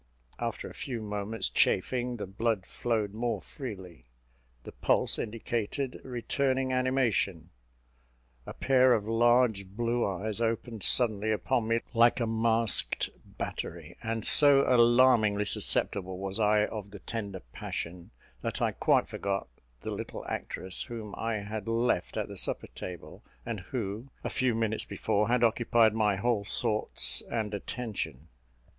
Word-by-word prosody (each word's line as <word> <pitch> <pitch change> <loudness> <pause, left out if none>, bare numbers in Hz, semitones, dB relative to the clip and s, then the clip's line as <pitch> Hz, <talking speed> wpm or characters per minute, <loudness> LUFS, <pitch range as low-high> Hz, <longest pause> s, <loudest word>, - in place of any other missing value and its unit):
After 115 -2 -3
a - - -10
few 130 -5 -5
moments' 105 +1 -2
chafing, 125 +5 +1
the 105 - -4
blood 100 0 -1
flowed 110 -4 -1
more 115 +2 -1
freely; 95 - -9 0.6
the - - -9
pulse - - +2
indicated 115 +4 -3
returning 130 +1 -1
animation; 125 - 0 1.0
a - - -6
pair 130 -1 +4
of 110 -3 0
large 115 -3 +3
blue 115 +4 -1
eyes 100 +3 -2
opened 115 -1 -2
suddenly 110 -3 +2
upon 110 +3 0
me 115 0 +1
like 120 +1 +5
a 120 - +1
masked 115 0 +2 0.3
battery; - - -5
and 115 -1 -2
so 140 -2 +7
alarmingly 120 -4 +5
susceptible 95 -1 0
was 95 +2 -3
I 105 0 +4
of 105 -2 -6
the 100 - -9
tender 100 -3 -5
passion, 85 +2 -5 0.3
that - - -3
I - - +1
quite - - +2
forgot 100 -6 -3 0.3
the - - -4
little - - -6
actress 95 -1 -4
whom 110 -3 -6
I 115 -2 -2
had 105 0 -5
left 115 +2 0
at - - -1
the - - -8
supper - - -2
table, 80 -4 -8 0.2
and 115 -3 -3
who, 110 +4 -5
a - - -3
few 130 -4 +1
minutes 110 -1 0
before, 105 +1 0
had 120 0 +2
occupied 115 -1 +4
my 105 -2 +2
whole 105 +1 0
thoughts 105 +1 +1
and 110 -2 -2
attention. 95 - -5
110 Hz, 140 wpm, -29 LUFS, 100-120 Hz, 1.0 s, so